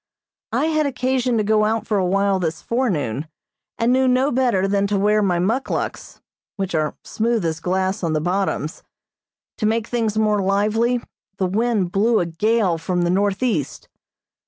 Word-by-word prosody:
I - - +1
had 310 -2 +1
occasion 255 -2 0
to 215 - +1
go 215 +1 +2
out 220 +1 0
for 210 -3 0
a 185 - +1
while 195 +1 +2
this 165 -3 -2
forenoon, 160 - -1 0.5
and 230 +2 +2
knew 260 0 +3
no 255 +3 +2
better 240 -7 +2
than 200 0 +1
to 205 0 0
wear 210 +2 +3
my 185 -4 +1
muckluks, 220 +10 -2 0.3
which 195 -2 -3
are 155 -2 0
smooth 225 -3 -1
as 160 -1 -1
glass 190 +3 -1
on 165 -2 0
the 155 - +1
bottoms. 175 -2 -2 0.8
To 215 - +1
make 225 0 0
things 225 -2 -1
more 210 -2 +2
lively, 215 +5 +1 0.4
the 190 - 0
wind 205 -1 0
blew 220 +4 +2
a 175 - 0
gale 185 +1 +1
from 175 +2 -1
the 175 - +1
northeast. 200 - -1
205 Hz, 170 wpm, -21 LUFS, 185-230 Hz, 0.8 s, knew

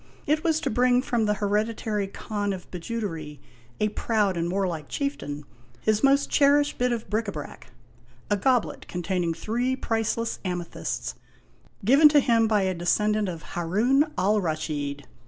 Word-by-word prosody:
It 305 +1 +1
was 320 -2 +2
to - - -1
bring 250 +2 +3
from 235 -4 0
the 210 0 +1
Heredi 210 +2 0
tary 210 -3 -2
Khan 205 0 -3
of 185 -2 -9
Bijoutery, 170 -6 -5 0.4
a 215 - +2
proud 210 -3 0
and 170 0 -1
warlike 180 -6 -2
chieftain, 150 - -3 0.4
his 215 +2 +1
most 275 +1 +4
cherished 290 0 +3
bit 250 0 +2
of 235 -2 -3
bric 220 +1 -1
a - - -2
brac, 150 -6 -8 0.6
a 205 - +2
goblet 245 +3 0
containing 175 -1 -1
three 245 +7 -1
priceless 230 -1 -1
amethysts, 175 -3 -3 0.7
given 280 +7 +7
to 295 0 +5
him 230 -4 +3
by 210 -2 +2
a 190 0 +1
descendant 210 +4 +1
of 165 -2 -6
Haroun 235 - +2
Alraschid. 155 -8 -1
210 Hz, 155 wpm, -26 LUFS, 180-245 Hz, 0.7 s, given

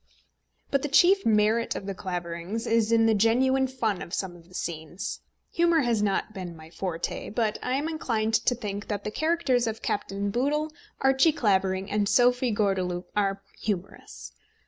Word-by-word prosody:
But 275 - +2
the 295 - -1
chief 370 +5 +5
merit 220 +1 +2
of - - -5
The 195 - -3
Claverings 180 +3 -4
is 230 -1 +2
in 225 -1 +5
the 225 - +4
genuine 260 +5 +3
fun 225 -7 -2
of 170 - -4
some 185 -3 -3
of 170 -1 -17
the 180 - -14
scenes. 165 +3 -5 0.3
Humour 335 -1 +3
has 235 -5 +1
not 210 +1 0
been 180 -4 -6
my 160 0 -13
forte, 170 -2 -4
but 215 0 -1
I 250 - -2
am 285 +4 0
inclined 225 -9 -1
to 245 - +4
think 205 -3 -5
that 205 -1 -3
the 210 - -3
characters 310 -6 +1
of 225 0 -4
Captain 200 0 -2
Boodle, 295 +6 0 0.3
Archie 270 +4 +4
Clavering, 190 -5 +1
and 205 -1 +1
Sophie 245 +3 +4
Gordeloup 190 -4 -1
are 195 -1 0 0.2
humorous. 175 - -5
210 Hz, 170 wpm, -27 LUFS, 190-250 Hz, 0.3 s, chief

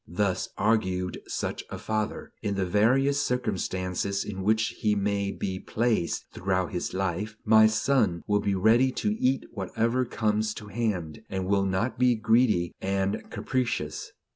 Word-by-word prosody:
Thus, 95 +2 -1
argued 95 -5 0
such - - -3
a - - -5
father, 110 -1 -3
in 100 -1 -1
the 95 -1 0
various 130 +9 +3
circumstances 100 -5 -1
in 95 -2 -5
which 110 +2 +2
he 105 -1 +2
may 100 0 0
be 95 -2 -4
placed 110 -7 0
throughout 95 -1 -1
his 90 - -3
life, 95 +3 -2
my 110 0 +7
son 110 -5 +1
will 105 0 +2
be 100 -1 0
ready 115 +7 +4
to 210 - 0
eat 130 +1 +1
whatever 115 +4 0
comes 110 -2 0
to 105 - -9
hand, 100 -7 -2
and 95 -2 -2
will 100 0 +2
not 95 +7 -1
be 125 -1 +4
greedy 110 -5 +2
and 95 +1 -1
capricious. 130 -2 -2
105 Hz, 150 wpm, -27 LUFS, 95-115 Hz, -, my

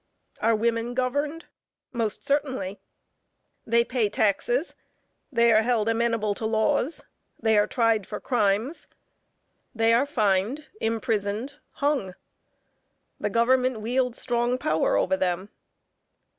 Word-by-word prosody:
Are 230 0 +3
women 230 +2 -1
governed? 285 +6 -1 0.5
Most 225 -4 -2
certainly; 260 -9 -1 0.9
they 235 +1 +4
pay 235 -3 0
taxes, 220 - 0 0.6
they 235 -2 +4
are 215 0 +5
held 225 -2 +1
amenable 230 -2 +1
to 220 - -5
laws; 220 +7 0 0.3
they 220 -1 +2
are 205 0 +4
tried 225 -4 +1
for - - -5
crimes; 230 +4 0 0.9
they 225 0 +3
are 250 +5 +3
fined, 225 +3 0
imprisoned, 225 +3 -1
hung. 275 -11 -1 1.0
The 210 - -1
government 250 +2 +2
wields 250 +2 0
strong 240 0 0
power 405 - +1
over 285 - +2
them. 185 -3 -1
230 Hz, 115 wpm, -25 LUFS, 215-255 Hz, 1.0 s, are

